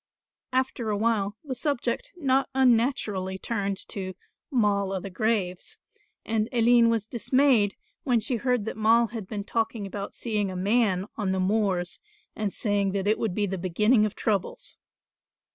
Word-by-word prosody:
After 255 -3 -1
a 210 - 0
while 210 -2 0
the 280 -4 -4
subject 295 - -2
not 270 -5 +1
unnaturally 230 -7 +2
turned 200 -2 -2
to 185 -2 -5 0.3
"Moll 200 -6 +1
o' 190 - -1
the 195 +1 -7
graves" 210 - -1 0.5
and 220 -1 0
Aline 235 0 +5
was 225 -3 +1
dismayed 240 -2 +2 0.3
when 245 -4 +2
she 235 +3 -1
heard 250 -2 0
that 220 - -5
Moll 225 +1 +4
had 220 -5 -6
been 205 -1 -4
talking 225 0 -2
about 200 0 -6
seeing 210 -4 -1
a 185 - -6
man 195 -1 +2
on 200 -4 0
the 190 - -1
moors, 185 -2 0 0.4
and 210 -2 -2
saying 200 -3 0
that 195 -1 -1
it 215 - +2
would 215 -6 -1
be 210 - +1
the 190 -1 -3
beginning 210 +6 +3
of 210 - -9
troubles. 355 - -2
215 Hz, 160 wpm, -26 LUFS, 195-235 Hz, 0.5 s, Aline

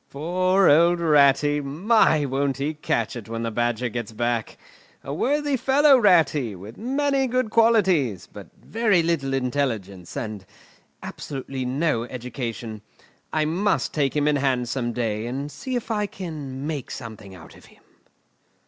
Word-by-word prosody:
Poor 185 +6 +1
old 170 +4 +5
Ratty! 145 -2 +4
My! 155 +2 +2
won't 135 0 -1
he 145 +3 -2
catch 125 -7 -2
it 115 -2 -8
when 115 0 -4
the 115 - -2
Badger 120 +1 -1
gets 120 -1 -5
back! 120 0 -2 0.5
A 140 - -5
worthy 290 - 0
fellow, 275 +3 +5
Ratty, 165 - +3
with 100 +5 -11
many 270 +3 0
good 250 -2 -1
qualities, 185 - +3
but - - -12
very 215 -6 +1
little 160 -5 0
intelligence 120 -9 -2
and 105 -3 -5 0.6
absolutely 135 -2 -6
no 130 -2 0
education. 120 -3 -6 0.5
I 155 -1 +1
must 185 +7 0
take 140 -3 0
him 150 0 +1
in 150 -1 +3
hand 130 -3 0
some 120 -2 -2
day, 115 -2 -2
and 140 +4 -4
see 260 - -5
if 240 -1 -3
I 210 -1 0
can 150 -8 -7
make 150 -5 -4
something 110 -6 -9
of 80 -3 -14
him." - - -22
140 Hz, 150 wpm, -24 LUFS, 120-180 Hz, 0.6 s, old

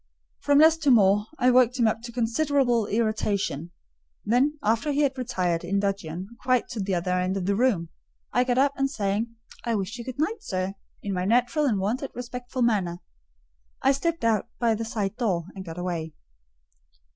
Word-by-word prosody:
From 285 0 +3
less 315 +2 +7
to 315 -3 +1
more, 205 -3 +5
I 250 +1 +4
worked 250 0 +4
him 235 -3 +3
up 220 +1 0
to 235 0 -8
considerable 245 -1 +1
irritation; 210 -7 -1 0.6
then, 260 +8 +2
after 225 +7 +1
he 285 +1 +1
had 280 -2 +2
retired, 185 -10 -1
in 195 +3 0
dudgeon, 190 -3 -3
quite 255 -1 +2
to 225 - -5
the 195 -1 -1
other 175 +1 -1
end 180 +1 0
of 185 - -3
the 200 - +2
room, 205 -8 +1 0.4
I 245 - +4
got 250 -1 0
up, 275 +1 +3
and 275 0 +1
saying, 215 0 -2 0.3
"I 235 -1 0
wish 205 +4 -3
you - - -5
good 255 0 -7
night, 405 +9 -1
sir," 185 - -3 0.3
in 200 - -2
my 180 0 -1
natural 245 +8 +2
and 220 -6 +1
wonted 230 +8 -1
respectful 245 +1 -4
manner, 195 -7 +1 0.9
I 270 - +5
slipped 330 +3 -1
out 225 -2 +2
by 235 -2 +2
the 225 +1 -3
side 215 -2 -3
door 190 -9 0
and 190 - -7
got 165 -2 -8
away. 170 -3 -3
225 Hz, 190 wpm, -26 LUFS, 195-255 Hz, 0.9 s, less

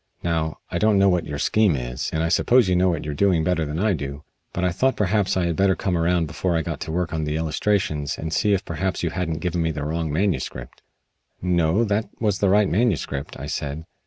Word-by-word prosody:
Now, 80 -2 -1
I - - -1
don't 105 -1 +3
know 95 0 +5
what 90 -2 0
your 75 - -4
scheme 105 +3 +2
is, - - -3
and 80 0 0
I 85 - 0
suppose 120 +7 +4
you 90 - +2
know 90 +1 +3
what 85 -4 -2
you 75 - -3
are - - -3
doing 85 +1 +2
better 80 -1 +1
than 75 +1 -4
I 105 +3 +2
do; 70 -2 -5 0.3
but 90 - -3
I 90 - +2
thought 130 +9 +1
perhaps 100 -1 +1
I 90 - +1
had 85 -1 0
better 95 +1 +3
come 95 -2 -1
around 85 0 +2
before 80 +3 -1
I 80 - 0
got - - -4
to 80 - -5
work 85 0 -1
on 80 -1 -1
the 75 0 -2
illustrations 80 -2 -1
and 80 0 -4
see 105 - +2
if 100 +2 -4
perhaps 95 -2 -2
you 85 - 0
hadn't 80 -4 -3
given 90 0 -1
me 80 - +1
the 75 -2 -3
wrong 80 0 -2
manuscript." 75 -8 -2 0.6
"No, 90 +3 +2
that 105 0 0
was 105 -4 0
the 100 - +3
right 105 +1 +4
manuscript," 95 - -1
I 70 - -5
said. 75 +1 -4
85 Hz, 245 wpm, -23 LUFS, 80-95 Hz, 0.6 s, know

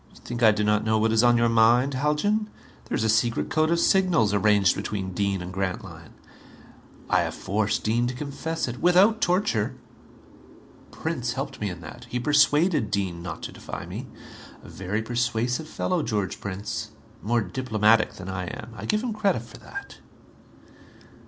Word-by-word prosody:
You - - -15
think 120 0 -6
I 115 - +7
do 105 0 +1
not 105 0 +2
know 110 0 +2
what 110 +1 +2
is 110 0 +4
on 120 0 +5
your 120 0 +3
mind, 115 +4 +4
Haljan? 150 +11 0 0.4
There - - -3
is - - 0
a - - +2
secret 110 +2 +1
code 155 0 +2
of 170 0 +2
signals 170 - +3
arranged 105 -2 +4
between 100 -2 -4
Dean 100 -1 -1
and 90 +1 -7
Grantline. 95 -4 -5 0.9
I - - +3
have - - -3
forced 105 +2 -1
Dean 120 +3 +1
to 125 - -4
confess 150 +4 -3
it. 120 0 -5
Without 195 +6 +5
torture! 175 - +1 1.1
Prince 125 -7 -3
helped 135 -1 -5
me 105 - -1
in 90 -2 -8
that. 120 +7 -10
He 125 - -2
persuaded 145 - +3
Dean 95 -4 -2
not 85 -3 -7
to - - -5
defy - - -7
me. - - -7 0.6
A - - -12
very 95 +4 -3
persuasive 120 +4 -1
fellow, 180 +2 -1
George 100 - -2
Prince. 105 +3 -4 0.3
More 120 +2 +1
diplomatic 110 +1 +2
than 95 - -9
I 95 -1 -3
am. 110 +5 -8
I - - -7
give 215 +1 +1
him 240 -3 -2
credit 200 - 0
for 115 - -13
that." 400 0 -9
115 Hz, 175 wpm, -25 LUFS, 105-145 Hz, 1.1 s, I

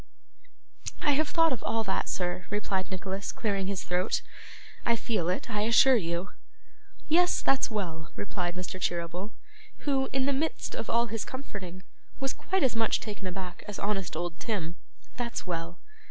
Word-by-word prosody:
'I 295 - +5
have 300 +2 +3
thought 330 -2 +4
of 245 - -4
all 225 0 +1
that, 190 -2 0
sir,' 180 0 -1
replied 195 -2 0
Nicholas, 190 +1 -3
clearing 200 -4 0
his 195 -1 -1
throat. 180 +1 +1 0.6
'I 235 - +4
feel 215 -7 0
it, 185 - -1
I 210 -3 0
assure 235 +4 +7
you.' 175 -2 0 0.8
'Yes, 355 +3 +5
that's 270 -1 +4
well,' 170 -8 -3
replied 180 -3 -2
Mr. 185 +1 -4
Cheeryble, 175 +3 -1 0.6
who, 270 -2 +2
in 265 0 +2
the 280 - +3
midst 310 +4 -1
of - - -3
all 235 +1 +4
his 225 -1 -2
comforting, 190 -9 -6 0.4
was 270 0 0
quite 380 -4 0
as 255 -3 +3
much 225 -1 +3
taken 205 -3 -5
aback 180 0 -5
as 205 - -4
honest 200 -5 -1
old 170 +1 -3
Tim; 175 -7 -2 0.4
'that's 240 -1 -2
well. 170 -1 -3
200 Hz, 165 wpm, -30 LUFS, 180-240 Hz, 0.8 s, assure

